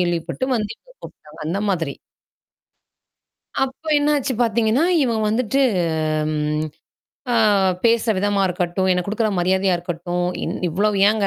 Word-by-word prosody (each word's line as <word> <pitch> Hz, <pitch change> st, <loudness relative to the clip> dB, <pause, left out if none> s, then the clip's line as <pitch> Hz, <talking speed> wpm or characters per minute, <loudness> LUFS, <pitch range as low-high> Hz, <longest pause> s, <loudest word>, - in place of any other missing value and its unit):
கேள்விப்பட்டு 175 Hz, +6 st, -1 dB
வந்து 210 Hz, -2 st, -3 dB
இவங்க -, -, -23 dB
கூப்புட்டாங்க. 150 Hz, +2 st, -13 dB
அந்த 190 Hz, +5 st, -1 dB
மாதிரி. 165 Hz, -7 st, -1 dB, 1.7 s
அப்போ 270 Hz, +4 st, -6 dB
என்னாச்சு 290 Hz, -2 st, +1 dB
பார்த்தீங்கன்னா, 230 Hz, +5 st, +2 dB, 0.2 s
இவங்க 230 Hz, -3 st, 0 dB
வந்துட்டு 250 Hz, +4 st, +1 dB, 0.7 s
ம் 150 Hz, 0 st, -1 dB, 0.7 s
அ -, -, +2 dB, 0.5 s
பேசுற 230 Hz, 0 st, +3 dB
விதமா 200 Hz, 0 st, +1 dB
இருக்கட்டும், 180 Hz, +1 st, -1 dB
எனக்கு 180 Hz, +1 st, -1 dB
குடுக்குற 215 Hz, +1 st, 0 dB
மரியாதையா 190 Hz, +1 st, +2 dB
இருக்கட்டும். 175 Hz, +1 st, -3 dB, 0.2 s
இ -, -, 0 dB, 0.2 s
இவ்வளோ 200 Hz, +6 st, +1 dB, 0.2 s
ஏன்ங்க. 210 Hz, -1 st, +1 dB
200 Hz, 125 wpm, -21 LUFS, 175-230 Hz, 1.7 s, பேசுற